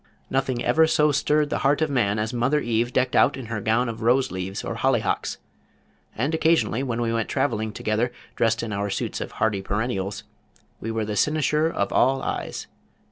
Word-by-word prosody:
Nothing 130 -2 0
ever 160 0 +4
so 150 -1 +3
stirred 150 +1 +1
the - - 0
heart 140 +1 +2
of 155 - +2
man 110 -6 +1
as 110 +3 -2
Mother 130 +5 +2
Eve 120 -2 0
decked 130 0 +1
out - - +4
in 130 - -6
her 105 - -2
gown 115 +4 +1
of 115 -1 -5
rose 125 +4 +2
leaves, 95 +1 -4
or - - -3
hollyhocks; - - 0 0.8
and 140 +8 -1
occasionally 160 -8 +2
when 120 -4 -2
we 115 -1 0
went 115 -1 -1
travelling 110 -2 0
together 110 +3 -1 0.2
dressed 115 0 +1
in 110 -3 -4
our 100 +1 -2
suits - - -3
of - - -6
hardy 105 -3 0
perennials, 100 -1 -2 0.6
we 115 - -5
were 110 -1 -1
the 105 0 -3
cynosure 150 +4 +2
of - - -2
all 135 +1 +3
eyes. - - -4
120 Hz, 190 wpm, -24 LUFS, 110-135 Hz, 0.8 s, ever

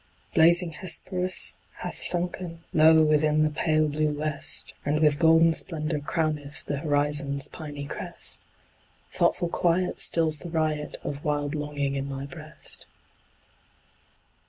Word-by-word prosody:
Blazing 170 +1 +4
Hesperus 185 +2 0 0.2
hath - - -6
sunken 175 -1 -3
Low 160 0 +6
within 155 0 +2
the 155 - +1
pale 155 0 +1
blue 150 +1 0
west, 150 0 0
And 150 +1 0
with 150 -2 +3
golden 165 0 +5
splendor 155 -2 +2
crowneth 150 -1 -3
The 145 - -3
horizon's 145 -1 +1
piny 145 -2 -8
crest; - - -1 0.7
Thoughtful 175 - +1
quiet 180 +1 0
stills 160 -2 +3
the 175 - -8
riot 155 -2 -2
Of 145 0 -6
wild 145 -1 -1
longing 145 -2 -3
in 135 0 -4
my 135 0 -5
breast. 155 +1 -5
155 Hz, 125 wpm, -26 LUFS, 145-165 Hz, 0.7 s, Low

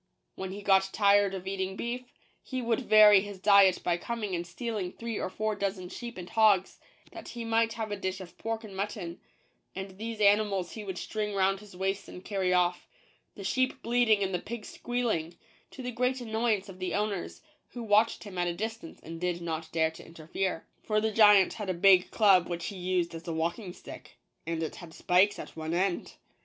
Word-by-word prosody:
Wheri 190 0 -5
he 205 - -7
got 195 -1 +4
tired 200 -1 +4
of 185 -1 -7
eating 190 0 -3
beef, 245 +4 -4 0.4
he 260 - -5
would 235 -1 0
vary 215 -5 +7
his 205 -1 -7
diet 195 -1 +5
by 175 -1 +1
coming 215 0 -4
and 170 0 -3
stealing 210 -1 -4
three 230 -1 -5
or - - -2
four 215 +3 -2
dozen 190 -3 -3
sheep 235 +2 -7
and 180 -1 -7
hogs, 210 -4 +3 0.3
that - - -10
he 235 -1 -6
might 225 0 +2
have 220 -2 -4
a - - -1
dish 190 -1 -3
of 180 -2 -11
pork 225 0 -3
and 205 -3 -10
mutton: 195 -3 -4 0.6
and 190 0 -7
these 225 0 -5
animals 200 -3 +3
he 220 - -7
would 190 -2 -5
string 210 -1 -3
round 195 0 +2
his 205 -3 -14
waist 195 +1 -2
and 180 - -11
carry 190 -3 0
off 180 -1 +1 0.2
— - - -39
the 200 - -8
sheep 255 +6 0
bleating 230 -3 +3
and 190 0 -2
the 180 - 0
pigs 225 +3 -7
squealing 225 -10 -2 0.2
— - - -33
to 260 - -9
the 250 - -3
great 250 +2 0
annoy 225 -1 +1
ance 195 0 -9
of 190 -1 -11
the 185 -1 -2
owners, 205 -3 -3 0.3
who 240 - -6
watched 215 +1 +3
him 195 -4 -7
at 175 - +1
a 170 - -2
distance 220 -2 -6
and 165 +1 -8
did 180 -1 -1
not 160 -1 -4
dare 160 -1 +2
to 160 - -12
interfere. 165 +2 -4 0.2
For 215 -1 +1
the 220 +1 0
giant 210 -3 +6
had 210 -3 -5
a 185 - 0
big 185 0 +5
club 195 -5 +4
which 170 -1 -3
he 200 - -5
used 180 -2 -1
as 165 +1 -9
a 165 - -2
walking 170 +5 -2
stick, - - -12 0.3
and 165 -1 -2
it 160 - -5
had 165 -2 -11
spikes 190 +3 +3
at - - -9
one 160 +1 -3
end. 185 0 -1
195 Hz, 215 wpm, -29 LUFS, 180-220 Hz, 0.6 s, vary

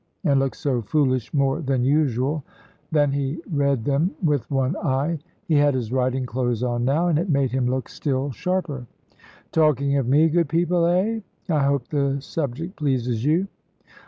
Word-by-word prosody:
and 140 -6 +3
looked 135 -1 -1
so 130 -4 -1
foolish 130 0 0
more 140 +2 +1
than 135 -4 0
usual, 140 +1 +1 0.5
that 145 -3 +3
he 140 +3 -2
read 140 -5 +1
them 145 +5 +2
with 145 -6 +1
one 135 +3 0
eye. 145 +2 0 0.3
He 160 - +1
had 145 -2 +4
his 120 -3 -3
riding 130 0 0
clothes 120 -2 -1
on 120 -1 -1
now, 150 +7 +2
and 160 -3 +2
it 180 +3 -2
made 140 -4 +2
him 130 -1 0
look 130 -1 -1
still 135 -1 -2
sharper. 150 - -3 0.6
"Talking 140 -3 +2
of 130 - -2
me, 150 +5 +5
good 170 -1 +1
people, 170 +1 +2
eh? 195 +6 +1 0.3
I 155 -4 +1
hope 140 -3 0
the 140 -2 0
subject 155 +5 -4
pleases 125 -6 -1
you. 165 +7 +2
140 Hz, 170 wpm, -23 LUFS, 130-155 Hz, 0.6 s, me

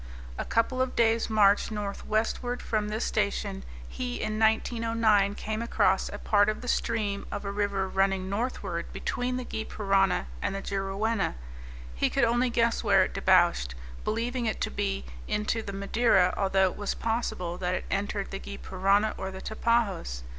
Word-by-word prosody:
A - - -2
couple 255 +3 +1
of 260 -1 -1
days' 230 0 +2
march 205 -2 +4
northwestward 215 +3 -2
from 210 -2 -1
this 215 +2 -1
station, 200 - -1 0.2
he 250 -1 -4
in 215 0 -2
1909 220 -2 +2
came 215 +1 -3
across 235 - +2
a - - -6
part 205 0 +3
of 215 - -3
the 250 - -7
stream 215 -4 -1
of 205 0 -4
a 200 - -2
river 200 -1 0
running 195 0 +1
northward 225 +6 -3
between 250 0 -2
the 255 - -4
Gy 220 - -4
Parana 195 - +1 0.2
and - - -1
the 195 - -3
Juruena; 195 +2 -1 0.6
he - - +1
could - - +1
only 240 +2 +3
guess 235 -1 +1
where 195 -2 +5
it - - -3
debouched, 175 - +3 0.3
believing 235 +2 -1
it 215 - -2
to - - -1
be 65 -1 -2 0.2
into 210 +2 0
the 205 - -6
Madeira, 200 -1 +3
although 190 -1 +2
it - - -11
was 205 -1 -2
possible 185 -6 -2
that 180 0 0
it - - -4
entered 200 0 -2
the 195 - -4
Gy 200 - -8
Parana 195 +3 +1
or 190 - -4
Tapajos. 195 - -1
210 Hz, 170 wpm, -28 LUFS, 195-230 Hz, 0.6 s, where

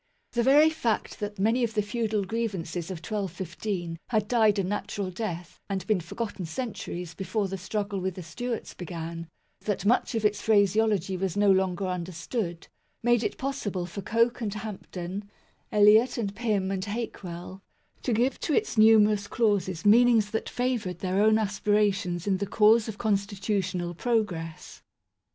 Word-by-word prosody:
The 240 - +1
very 290 +6 +6
fact 235 -8 -2
that 205 0 -4
many 225 +6 +2
of 230 -1 -1
the 210 - +2
feudal 215 -1 -1
grievances 185 -6 -3
of 180 -4 -6
1215 180 -3 -4
had 215 -3 0
died 220 -3 +3
a 195 - +1
natural 200 0 -3
death 175 -4 -5
and 195 -1 -2
been 215 -4 +2
forgotten 195 0 -5
centuries 180 -4 -5
before 195 +2 -2
the 190 0 -5
struggle 200 +1 -3
with 185 -1 -2
the 185 - -7
Stewarts 230 +9 -5
began; 165 -1 -6 0.3
that 205 -2 -3
much 240 +2 +2
of 220 -1 0
its 210 0 +2
phraseology 205 -2 +2
was 190 0 -2
no 205 -1 +5
longer 190 0 +1
understood, 175 +1 -4 0.4
made 240 -1 +3
it - - -2
possible 265 - -3
for 180 +3 -6
Coke 230 +4 +1
and 210 -2 -2
Hampden, 200 -2 -6 0.4
Eliot 215 +4 +5
and 205 -4 -2
Pym 210 -5 0
and 190 -1 -2
Hakewell, 190 -4 -6 0.4
to 250 - -1
give 240 +4 +1
to 310 - 0
its 430 - 0
numerous 215 -2 +5
clauses 200 -8 0
meanings 225 -1 +5
that 220 - -2
favoured 240 -8 -1
their 185 +2 0
own 215 +1 +5
aspirations 200 -4 +1
in 195 -2 +2
the 200 +1 -3
cause 220 +2 +4
of 215 -2 -5
constitutional 195 -4 -1
pro 230 +5 +2
gress. 165 -5 -8
205 Hz, 160 wpm, -27 LUFS, 185-220 Hz, 0.4 s, very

